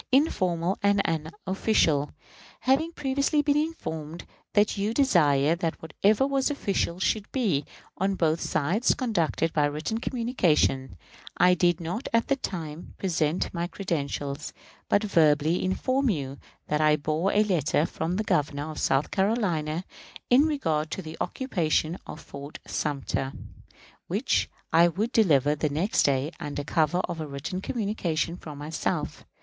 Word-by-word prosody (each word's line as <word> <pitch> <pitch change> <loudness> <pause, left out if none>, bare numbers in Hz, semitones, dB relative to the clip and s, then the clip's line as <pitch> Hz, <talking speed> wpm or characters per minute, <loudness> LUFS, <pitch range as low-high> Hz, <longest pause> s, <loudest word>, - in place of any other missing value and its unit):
informal 185 - +2
and 200 0 +3
unofficial. 165 -2 +1 0.5
Having 280 +6 +2
previously 280 +1 +1
been 290 0 +2
informed 170 - -3 0.3
that 205 +1 +3
you 210 +3 -1
desired 160 - +3
that 165 -2 -2
whatever 200 - +2
was 275 0 +1
official 195 -10 -1
should 205 +2 0
be, 200 - +1 0.4
on 195 +1 +1
both 165 -2 +1
sides, 180 - +1
conducted 170 - 0
by 150 - +2
written 155 +10 -2
communications, 175 - +1 0.4
I 180 0 +6
did 175 -1 +2
not 175 +10 -4
at 230 0 +2
that 275 -1 +1
time 160 -3 -6
present 165 -3 0
my 170 0 -2
credentials, 145 -6 -3 0.4
but 205 - +3
verbally 160 -3 +3
informed 255 +8 +1
you 140 -3 -5 0.3
that 150 0 0
I 155 0 +5
bore 155 +6 0
a 210 - +4
letter 165 -6 +1
from 170 +1 -3
the 215 - 0
Governor 150 -4 0
of 155 - -7
South 135 +2 +1
Carolina 185 -6 0 0.5
in 275 +5 +6
regard 160 - 0
to 190 - -5
the 160 0 -7
occupation 175 - 0
of - - -7
Fort 140 +2 -9
Sumter, 135 -2 -2 0.7
which - - 0 0.2
I 170 +1 +7
would 205 +8 -1
deliver 150 - +4
the 150 0 -1
next 165 +9 +1
day 140 +2 +1
under 145 0 -4
cover 160 +4 +1
of 170 -3 -4
a 155 - -4
written 145 +7 -5
communication 190 -8 -1
from 150 -4 -9
myself. 150 +2 -3
170 Hz, 145 wpm, -27 LUFS, 150-215 Hz, 0.7 s, I